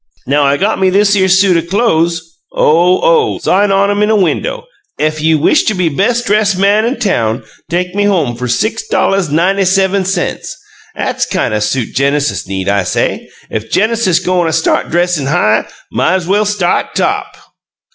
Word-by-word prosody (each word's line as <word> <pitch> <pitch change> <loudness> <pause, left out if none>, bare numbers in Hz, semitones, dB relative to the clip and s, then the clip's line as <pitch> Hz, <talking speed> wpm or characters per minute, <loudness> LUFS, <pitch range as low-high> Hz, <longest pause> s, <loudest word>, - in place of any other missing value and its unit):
'Nen 140 +3 +1
I 140 0 +2
got 205 +6 0
me 190 - +3
thishere 200 0 +2
suit 185 -3 +3
o' - - -15
clo'es 170 -5 +1 0.3
OH, 175 +4 +2
oh! 475 -4 +2
Sign 200 +2 +1
on 200 +1 +2
'em 205 0 -1
in 210 0 +2
window: - - -2 0.3
'Ef 155 0 -1
you 160 0 +2
wish 165 - +3
to 215 - 0
be 180 -3 0
bes' 230 - 0
dress' 210 -1 +1
man 200 +3 +2
in 245 +2 -2
town 120 - -1 0.3
take 180 +1 -2
me 205 +1 0
home 165 -12 0
fer 125 +1 -5
six 220 - -2
dolluhs 195 - +1
ninety 180 +6 +1
sevum 190 +1 +1
cents.' 185 -1 -3 0.4
''At's - - -2
kine - - -1
o' 105 - 0
suit 115 +3 -2
Genesis 140 -2 -1
need,' 95 -1 -3
I 100 0 +1
say. 90 - -2 0.2
'Ef 110 0 -4
Genesis 220 -4 +1
go'n' 180 -1 0
a - - -3
start 160 - 0
dressin' 175 -4 0
high, 105 -7 +1 0.3
might's 185 0 0
well 205 +4 +1
start 195 -4 -1
top!'" - - -2
185 Hz, 175 wpm, -13 LUFS, 155-205 Hz, 0.4 s, me